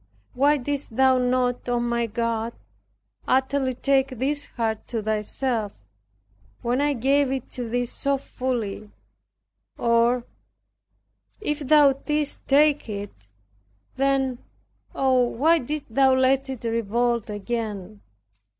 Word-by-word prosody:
Why 285 Hz, +3 st, +3 dB
didst 280 Hz, -3 st, -4 dB
thou 260 Hz, 0 st, +4 dB
not, 250 Hz, 0 st, 0 dB
O 240 Hz, 0 st, +1 dB
my 235 Hz, 0 st, 0 dB
God, 230 Hz, +1 st, -2 dB, 0.7 s
utterly 265 Hz, 0 st, +1 dB
take 270 Hz, +1 st, +2 dB
this 275 Hz, +3 st, -2 dB
heart 225 Hz, -2 st, -3 dB
to 225 Hz, -3 st, -3 dB
thyself, 220 Hz, +1 st, -1 dB, 0.9 s
when 245 Hz, +3 st, +1 dB
I 290 Hz, 0 st, +2 dB
gave 275 Hz, +2 st, +2 dB
it 265 Hz, -2 st, -4 dB
to 245 Hz, -2 st, -4 dB
Thee 245 Hz, +1 st, 0 dB
so 275 Hz, +3 st, -1 dB
fully. 240 Hz, -6 st, -4 dB, 0.9 s
Or, 235 Hz, +1 st, +2 dB, 1.1 s
if 300 Hz, -8 st, -2 dB
Thou 290 Hz, -1 st, +5 dB
didst 295 Hz, +2 st, -3 dB
take 290 Hz, -2 st, +3 dB
it 200 Hz, -, -7 dB, 0.7 s
then, 270 Hz, -2 st, +1 dB, 0.6 s
oh, 260 Hz, -2 st, +3 dB
why 295 Hz, +7 st, +3 dB
didst 290 Hz, -2 st, -5 dB
Thou 265 Hz, +1 st, +5 dB
let 265 Hz, +1 st, +2 dB
it 260 Hz, -3 st, -6 dB
revolt 230 Hz, 0 st, 0 dB
again? 210 Hz, -2 st, -4 dB
250 Hz, 115 wpm, -24 LUFS, 230-275 Hz, 1.1 s, Thou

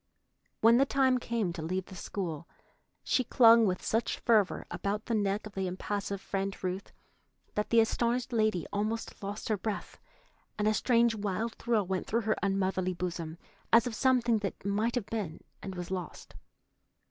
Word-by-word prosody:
When 230 Hz, +2 st, +7 dB
the 270 Hz, -, +5 dB
time 265 Hz, -2 st, +3 dB
came 230 Hz, -7 st, -1 dB
to 170 Hz, -, -6 dB
leave 185 Hz, +3 st, -2 dB
the 190 Hz, -, -11 dB
school, 170 Hz, -3 st, -4 dB, 0.6 s
she 255 Hz, -, +2 dB
clung 230 Hz, -1 st, +6 dB
with 185 Hz, -1 st, -2 dB
such 225 Hz, +2 st, 0 dB
fervor 215 Hz, -5 st, +2 dB
about 205 Hz, +2 st, -2 dB
the 235 Hz, -, -2 dB
neck 205 Hz, -1 st, 0 dB
of 215 Hz, -, -9 dB
the 190 Hz, -1 st, -2 dB
impassive 200 Hz, +2 st, -3 dB
Friend 195 Hz, 0 st, -3 dB
Ruth 185 Hz, +2 st, -3 dB, 0.6 s
that 210 Hz, -, -1 dB
the 230 Hz, -1 st, +6 dB
astonished 240 Hz, +2 st, 0 dB
lady 215 Hz, -5 st, +1 dB
almost 215 Hz, +2 st, -2 dB
lost 200 Hz, +1 st, -5 dB
her 215 Hz, -, +2 dB
breath, 210 Hz, +2 st, -5 dB, 0.6 s
and 210 Hz, 0 st, +1 dB
a 215 Hz, -, +4 dB
strange 235 Hz, 0 st, +3 dB
wild 215 Hz, +2 st, -2 dB
thrill 230 Hz, -4 st, 0 dB
went 185 Hz, 0 st, -2 dB
through 230 Hz, +2 st, +1 dB
her 220 Hz, 0 st, +1 dB
unmotherly 190 Hz, -2 st, 0 dB
bosom, 170 Hz, -2 st, -4 dB, 0.3 s
as 230 Hz, 0 st, +6 dB
of 245 Hz, -, -3 dB
something 240 Hz, -2 st, +3 dB
that 195 Hz, -2 st, -5 dB
might 215 Hz, +4 st, 0 dB
have 245 Hz, -5 st, -1 dB
been 200 Hz, -9 st, -4 dB, 0.2 s
and 190 Hz, -1 st, -6 dB
was 180 Hz, 0 st, -6 dB
lost. 185 Hz, -2 st, -6 dB
210 Hz, 170 wpm, -30 LUFS, 190-230 Hz, 0.6 s, When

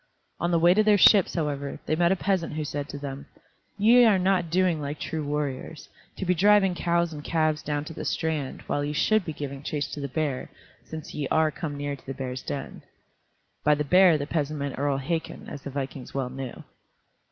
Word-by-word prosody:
On 170 Hz, -, 0 dB
the 170 Hz, -, +3 dB
way 170 Hz, +2 st, +5 dB
to 215 Hz, -, +4 dB
their 210 Hz, -1 st, +5 dB
ships, 200 Hz, -1 st, +6 dB
however, 145 Hz, -4 st, -2 dB
they 155 Hz, -, +1 dB
met 170 Hz, +2 st, +3 dB
a -, -, +4 dB
peasant 185 Hz, -3 st, -1 dB
who 155 Hz, 0 st, -3 dB
said 145 Hz, 0 st, -4 dB
to -, -, -6 dB
them, 140 Hz, -1 st, -7 dB, 0.5 s
"Ye 235 Hz, +4 st, +6 dB
are 215 Hz, -4 st, +5 dB
not 185 Hz, -2 st, +1 dB
doing 175 Hz, -2 st, +2 dB
like 145 Hz, +1 st, -4 dB
true 160 Hz, -1 st, -3 dB
warriors, 145 Hz, 0 st, -4 dB, 0.3 s
to 190 Hz, -, -3 dB
be 180 Hz, -, +3 dB
driving 195 Hz, +1 st, +4 dB
cows 170 Hz, -1 st, 0 dB
and 145 Hz, -1 st, -8 dB
calves 155 Hz, -1 st, +1 dB
down 145 Hz, 0 st, -2 dB
to 160 Hz, -, -7 dB
the -, -, -6 dB
strand, 155 Hz, -5 st, -2 dB
while 145 Hz, -, -1 dB
ye 145 Hz, +1 st, -2 dB
should 215 Hz, +7 st, +2 dB
be 165 Hz, -, -4 dB
giving 140 Hz, -2 st, -6 dB
chase 145 Hz, -1 st, -2 dB
to -, -, -5 dB
the 140 Hz, -, -3 dB
bear, 140 Hz, -1 st, -2 dB, 0.3 s
since 160 Hz, -1 st, -8 dB
ye 145 Hz, -2 st, -2 dB
are 155 Hz, +1 st, +2 dB
come 145 Hz, -1 st, -5 dB
near 145 Hz, 0 st, -3 dB
to 140 Hz, -, -19 dB
the 135 Hz, -, -4 dB
bear's 130 Hz, -1 st, -4 dB
den." 140 Hz, -, -6 dB, 0.8 s
By 150 Hz, 0 st, +4 dB
the 150 Hz, -, -1 dB
bear 180 Hz, +2 st, +6 dB
the 145 Hz, -, -3 dB
peasant 150 Hz, -1 st, -2 dB
meant 140 Hz, -2 st, -4 dB
Earl 140 Hz, -1 st, +1 dB
Hakon, 160 Hz, +4 st, -4 dB
as 145 Hz, -, -7 dB
the 140 Hz, -, -6 dB
vikings 135 Hz, -1 st, -6 dB
well 130 Hz, -2 st, -2 dB
knew. 130 Hz, -1 st, -7 dB
150 Hz, 220 wpm, -26 LUFS, 140-175 Hz, 0.8 s, ships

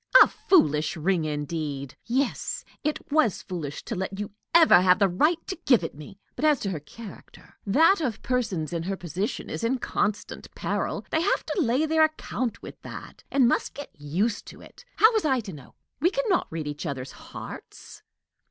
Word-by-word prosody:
"A -, -, +2 dB
foolish 155 Hz, -, +2 dB
ring, 170 Hz, 0 st, +1 dB
indeed! 145 Hz, -2 st, -4 dB
Yes, 260 Hz, +2 st, -1 dB, 0.2 s
it 300 Hz, 0 st, 0 dB
was 285 Hz, -, +2 dB
foolish 155 Hz, -6 st, -5 dB
to -, -, -5 dB
let 190 Hz, 0 st, -3 dB
you 205 Hz, -1 st, -4 dB, 0.2 s
ever 325 Hz, -, +7 dB
have 180 Hz, 0 st, +5 dB
the 200 Hz, -, +4 dB
right 300 Hz, -, +2 dB
to 375 Hz, -, -5 dB
give 245 Hz, -9 st, +5 dB
it 165 Hz, -, -4 dB
me! 155 Hz, +7 st, -12 dB, 0.2 s
But, -, -, -6 dB
as 300 Hz, -4 st, +4 dB
to 195 Hz, -, -2 dB
her 165 Hz, -, -3 dB
character, 200 Hz, +7 st, -13 dB
that 325 Hz, -, +5 dB
of 245 Hz, -8 st, -2 dB
persons 200 Hz, -11 st, -1 dB
in 170 Hz, -, -1 dB
her 190 Hz, +3 st, -3 dB
position 180 Hz, +4 st, -3 dB
is -, -, -5 dB
in 245 Hz, +3 st, +1 dB
constant 210 Hz, -4 st, -2 dB
peril. -, -, -2 dB
They 320 Hz, -, +2 dB
have 380 Hz, -, +1 dB
to 375 Hz, -, -1 dB
lay 260 Hz, +3 st, +2 dB
their 315 Hz, 0 st, +4 dB
account 255 Hz, -7 st, -4 dB
with -, -, -10 dB
that, -, -, -10 dB
and 265 Hz, -3 st, +4 dB
must -, -, 0 dB
get 285 Hz, +1 st, -8 dB
used 175 Hz, +10 st, -2 dB
to -, -, -11 dB
it. -, -, -15 dB
How 440 Hz, +2 st, +6 dB
was 440 Hz, -, +1 dB
I 265 Hz, -4 st, +2 dB
to 200 Hz, -4 st, -8 dB
know? 140 Hz, -4 st, -13 dB, 0.2 s
We 330 Hz, +5 st, +4 dB
can -, -, -1 dB
not 365 Hz, -, +2 dB
read 160 Hz, -1 st, -4 dB
each 150 Hz, +3 st, -4 dB
other's 135 Hz, -2 st, -5 dB
hearts." -, -, -10 dB
205 Hz, 195 wpm, -26 LUFS, -, 0.2 s, ever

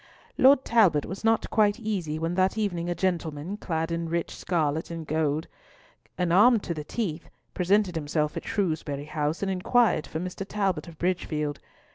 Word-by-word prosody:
Lord 270 Hz, +1 st, +5 dB
Talbot 185 Hz, -11 st, +4 dB
was 190 Hz, +4 st, -7 dB
not 225 Hz, 0 st, +2 dB
quite 210 Hz, 0 st, +3 dB
easy 190 Hz, -9 st, -2 dB
when 165 Hz, +2 st, -2 dB
that 185 Hz, +3 st, +1 dB
evening 175 Hz, -5 st, -1 dB
a 175 Hz, -, -1 dB
gentleman, 170 Hz, -1 st, -2 dB
clad 165 Hz, -4 st, -2 dB
in 170 Hz, 0 st, -2 dB
rich 170 Hz, 0 st, -2 dB
scarlet 160 Hz, -3 st, -1 dB
and 165 Hz, -1 st, -6 dB
gold, 155 Hz, 0 st, 0 dB, 0.7 s
and 180 Hz, -2 st, +1 dB
armed 225 Hz, +3 st, +6 dB
to 170 Hz, -, -2 dB
the 155 Hz, -2 st, -5 dB
teeth, 170 Hz, -3 st, -4 dB, 0.2 s
presented 190 Hz, +1 st, +2 dB
himself 150 Hz, 0 st, -1 dB
at 165 Hz, -, -4 dB
Shrewsbury 155 Hz, -8 st, -2 dB
House 150 Hz, +3 st, -2 dB
and 195 Hz, -, 0 dB
inquired 205 Hz, 0 st, +2 dB
for 160 Hz, -, -4 dB
Mr. 185 Hz, +2 st, -5 dB
Talbot 195 Hz, -3 st, -1 dB
of 165 Hz, -2 st, -11 dB
Bridgefield. 155 Hz, -5 st, -1 dB
170 Hz, 170 wpm, -27 LUFS, 155-195 Hz, 0.7 s, armed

